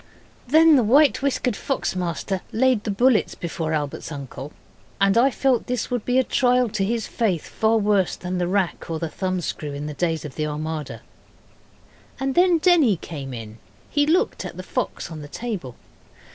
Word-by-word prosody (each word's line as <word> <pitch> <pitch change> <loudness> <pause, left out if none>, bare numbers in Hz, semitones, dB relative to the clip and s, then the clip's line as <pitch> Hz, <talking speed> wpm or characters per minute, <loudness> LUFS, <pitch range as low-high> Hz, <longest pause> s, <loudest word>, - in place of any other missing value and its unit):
Then 315 +2 +6
the 250 - +3
white 280 +8 +4
whiskered 260 -4 0
fox 270 -5 -2
master 180 +1 -2
laid 250 -2 +2
the - - -2
bullets 235 +3 +2
before 165 -2 -4
Albert's 150 0 -3
uncle, 140 0 -7 0.5
and 195 0 +3
I 245 +4 +5
felt 265 -2 +1
this 250 -1 -2
would 245 -3 -2
be 250 +1 +1
a 260 - +5
trial 250 -1 +2
to 200 -1 -1
his 225 +3 -1
faith 195 -9 -1
far 220 +1 +1
worse 205 -3 +2
than 180 0 -4
the 175 - 0
rack 185 -2 -1
or 165 - -2
the 165 0 -3
thumb 185 +1 -2
screw 150 -3 -4
in 145 +1 -5
the 150 - -4
days 165 -1 -1
of 145 - -7
the 155 +3 -2
Armada. 155 0 -5 1.2
And 270 0 -1
then 355 +1 +4
Denny 315 - +4
came 140 -5 -7
in. 110 -2 -8 0.3
He 290 0 +2
looked 365 +8 +1
at - - -7
the - - -6
fox - - -3
on 155 -2 -7
the 145 - -8
table. 180 - -5
200 Hz, 185 wpm, -23 LUFS, 160-250 Hz, 1.2 s, Then